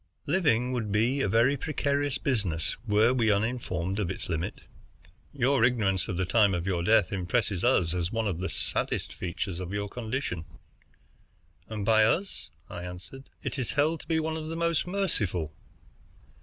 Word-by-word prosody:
"Living 145 -7 +2
would 115 -5 -2
be 120 +7 +2
a 105 - +1
very 115 +7 +4
precarious 145 -1 -1
business, 95 - -1
were 110 +3 +4
we 115 -4 +3
uninformed 100 -4 -1
of 95 -5 -1
its 95 - -5
limit. 85 0 -3 0.7
Your 135 -2 +2
ignorance 105 -7 +2
of 95 -6 -3
the 95 - +1
time 100 -1 +4
of 85 0 -3
your 90 -3 0
death 105 +3 +3
impresses 95 0 0
us 95 -10 +3
as 90 -1 -1
one 115 -1 0
of 90 -4 -2
the 95 - -2
saddest - - -1
features 90 +1 -4
of 90 0 -5
your 100 0 -2
condition." 110 - -4 1.2
"And 105 -2 -3
by 110 0 +5
us," 175 - 0 0.2
I 90 - -7
answered, 90 +10 -9
"it - - -3
is 125 - -2
held 155 +2 +2
to - - -14
be 160 -1 +2
one 160 0 -2
of 155 -1 -5
the 165 - -4
most 170 0 +1
merciful." 105 - -1
110 Hz, 170 wpm, -28 LUFS, 95-135 Hz, 1.2 s, by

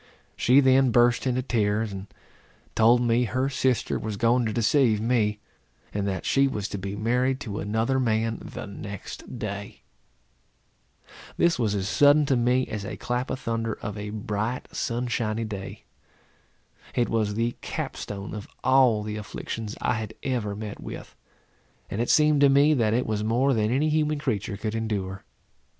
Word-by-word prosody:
She 130 +3 +5
then 130 0 +5
burst 120 +1 +3
into 130 0 0
tears, 110 -3 0
and 95 0 -7 0.7
told 115 +2 +5
me 120 0 +2
her 130 +4 0
sister 130 -4 0
was 110 -2 -4
going 120 +2 +2
to - - -1
deceive 115 0 +3
me; 110 -2 +1 0.5
and 100 -1 -1
that 95 -3 -3
she 140 0 +3
was 105 -7 -3
to 100 - -4
be 100 +1 -4
married 125 +5 +1
to 105 -4 -4
another 110 +6 0
man 115 -2 0
the - - -7
next 100 +4 -8
day. 100 -2 -6 1.5
This 170 -6 +3
was 105 -4 +1
as 95 -1 -1
sudden 145 +4 +5
to 135 - +2
me 125 +1 +2
as 105 -2 -5
a 100 - -6
clap 125 +1 -2
of 130 - -3
thunder 115 -1 -2
of 105 -2 -4
a 105 0 -5
bright 110 +3 -3
sunshiny 115 -2 -1
day. 100 -3 -7 1.1
It 120 - +2
was 105 -2 0
the 115 +2 0
cap - - -4
stone 100 -1 -6
of 105 -2 -6 0.2
all 130 -5 +4
the 105 0 -4
afflictions 105 +1 -5
I - - +2
had 110 - -6
ever 115 -6 -1
met 105 0 -6
with; - - -8 0.8
and 105 - -1
it 120 - -1
seemed 150 -1 +4
to 140 - +7
me, 140 +3 +5
that 115 -5 +2
it 125 - +1
was 105 -1 -1
more 125 +5 +2
than 110 -2 +1
any 140 +6 +2
human 155 0 +1
creature 110 -8 -2
could 110 +1 -3
endure. 100 -4 -3
115 Hz, 170 wpm, -26 LUFS, 105-130 Hz, 1.5 s, to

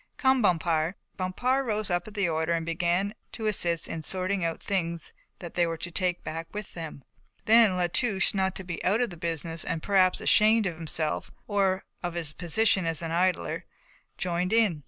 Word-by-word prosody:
Come, 265 -1 +3
Bompard." 170 -3 +2 0.2
Bompard 245 +9 0
rose 215 -3 0
up 175 +2 0
at 215 - -10
the 200 -3 +2
order 160 0 0
and 165 -1 -1
began 175 +4 0 0.2
to 220 - -5
assist 175 -6 +1
in 165 - -4
sorting 185 +3 -1
out 165 -1 -1
the - - -15
things 170 -4 -2 0.2
they 175 0 -1
were 165 0 -3
to 175 +2 -5
take 180 0 0
back 165 +1 -5
with 210 -1 -6
them. 160 -5 -7 0.4
Then 220 -4 +6
La 180 - +2
Touche, 195 +2 +1
not 190 -1 0
to 190 - -5
be 175 -2 -5
out 205 +5 +2
of 245 - 0
the - - -7
business 165 -1 -3
and 160 - -3
perhaps 190 -2 +3
ashamed 215 +1 +4
of 175 -4 -2
himself, 160 -1 -3 0.2
or 195 -2 +1 0.2
of 175 -1 -3
his 160 -3 -1
position 185 +2 +1
as 165 0 0
an 165 - -3
idler, 180 +2 0 0.5
joined 180 +2 -1
in. 215 -9 +3
180 Hz, 195 wpm, -28 LUFS, 165-200 Hz, 0.5 s, Then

